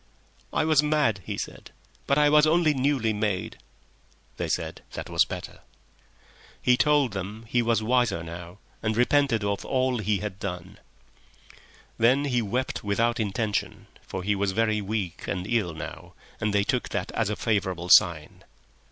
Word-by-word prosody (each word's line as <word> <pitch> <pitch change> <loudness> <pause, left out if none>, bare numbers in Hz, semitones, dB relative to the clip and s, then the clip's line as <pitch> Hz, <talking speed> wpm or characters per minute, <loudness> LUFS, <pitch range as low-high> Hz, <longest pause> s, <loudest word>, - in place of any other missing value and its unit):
"I - - +1
was 155 -2 +4
mad," 150 -10 +1
he - - -4
said. - - -7 0.4
"But 140 - +3
I 150 0 +5
was 150 +1 +5
only 160 -1 +3
newly 130 -5 +1
made." 105 -3 -2 0.8
They - - -2
said - - -3
that - - -6
was - - +4
better. - - -7 1.0
He 125 - +4
told 145 -4 +3
them 105 +4 -6
he 120 +2 +1
was 115 -2 +1
wiser 115 -6 +1
now, 85 +2 -9 0.2
and 110 0 -1
repented 125 -3 +3
of 100 -1 -1
all 130 -2 0
he 105 -1 +1
had 100 -1 -6
done. 95 -1 -6 1.2
Then 130 +5 +4
he 125 -4 +1
wept 125 +5 -2
without 115 +4 +1
intention, 105 0 -2 0.2
for 95 - -6
he 105 +2 +1
was 100 -1 -1
very 110 0 +1
weak 100 -3 -4
and 90 -2 -3
ill 105 -7 0
now, 75 - -8 0.2
and 110 -1 0
they 100 0 +2
took 125 +4 -1
that 95 -2 -3
as 110 -3 -1
a 105 - -1
favourable 95 -6 -1
sign. 85 -6 +4
110 Hz, 160 wpm, -26 LUFS, 100-125 Hz, 1.2 s, I